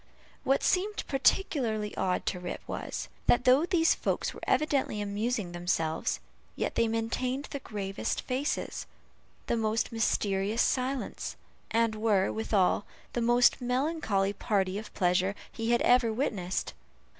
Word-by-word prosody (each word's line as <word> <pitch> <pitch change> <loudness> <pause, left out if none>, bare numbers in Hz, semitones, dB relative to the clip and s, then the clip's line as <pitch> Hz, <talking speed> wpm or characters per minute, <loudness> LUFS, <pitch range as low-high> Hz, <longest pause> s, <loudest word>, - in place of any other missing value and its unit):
What 270 +1 +2
seemed 410 +3 +1
particularly 250 - +1
odd 185 -1 0
to 180 - -1
Rip 180 0 -5
was, - - -4 0.2
that 245 - +4
though 270 +6 +5
these 335 -3 +4
folks - - -1
were - - -10
evidently 280 -8 +1
amusing 205 -1 -2
themselves, 175 -2 -1 0.4
yet - - -2
they 230 - +2
maintained 250 +5 -1
the 280 - -3
gravest 200 -5 -3
faces, 265 +4 -2 0.6
the - - 0
most 220 0 0
mysterious 210 -1 +1
silence, 260 0 -1 0.3
and 230 0 +2
were, 215 -3 +2
withal, 205 -3 +1 0.3
the 240 - -1
most 240 +2 +4
melancholy 250 -6 0
party 195 -1 0
of 215 - -10
pleasure 185 +1 +2 0.2
he 225 0 -3
had 240 0 +3
ever 245 -2 +4
witnessed. 210 -7 -2
225 Hz, 135 wpm, -29 LUFS, 200-255 Hz, 0.6 s, though